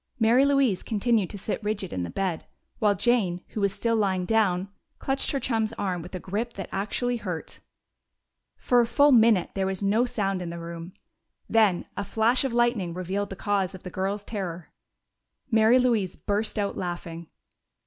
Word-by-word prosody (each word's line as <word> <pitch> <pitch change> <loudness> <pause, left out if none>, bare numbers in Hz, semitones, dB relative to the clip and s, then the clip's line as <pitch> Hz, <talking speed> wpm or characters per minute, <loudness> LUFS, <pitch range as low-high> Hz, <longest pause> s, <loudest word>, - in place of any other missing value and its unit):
Mary 240 +4 +5
Louise 275 -8 +2
continued 220 -2 +1
to 205 - -7
sit 210 +3 -4
rigid 205 -3 -3
in 90 - -2
the 85 - -3
bed, 185 - -2 0.3
while 205 -2 +3
Jane, 195 -5 +1
who 215 - -4
was 200 -1 +2
still 230 +4 0
lying 190 -4 +1
down, 195 -3 +1 0.3
clutched 270 0 -1
her 275 - 0
chum's 225 -4 -1
arm 185 -4 -2
with 175 +3 -9
a - - -3
grip 215 +7 -3
that 195 - -6
actually 240 +5 -1
hurt. 180 -7 -6 1.0
For 245 -1 +3
a 235 - +1
full 285 +5 +4
minute 225 -7 +5
there 190 -1 -1
was 190 +1 -3
no 215 +5 +3
sound 195 -6 -1
in 175 - -4
the 170 - -6
room. 170 +1 -7 0.5
Then 215 -6 +3
a 200 - -2
flash 225 +5 +2
of 270 - -1
lightning 235 -7 +1
revealed 190 +3 -2
the 195 - -6
cause 195 -1 -1
of 185 - -12
the 180 - -7
girls' 200 +3 -2
terror. 180 -6 -5 0.8
Mary 225 +2 +5
Louise 230 -8 +1
burst 210 +2 -2
out 200 -1 -1
laughing. 170 -2 -5
205 Hz, 180 wpm, -26 LUFS, 185-230 Hz, 1.0 s, Mary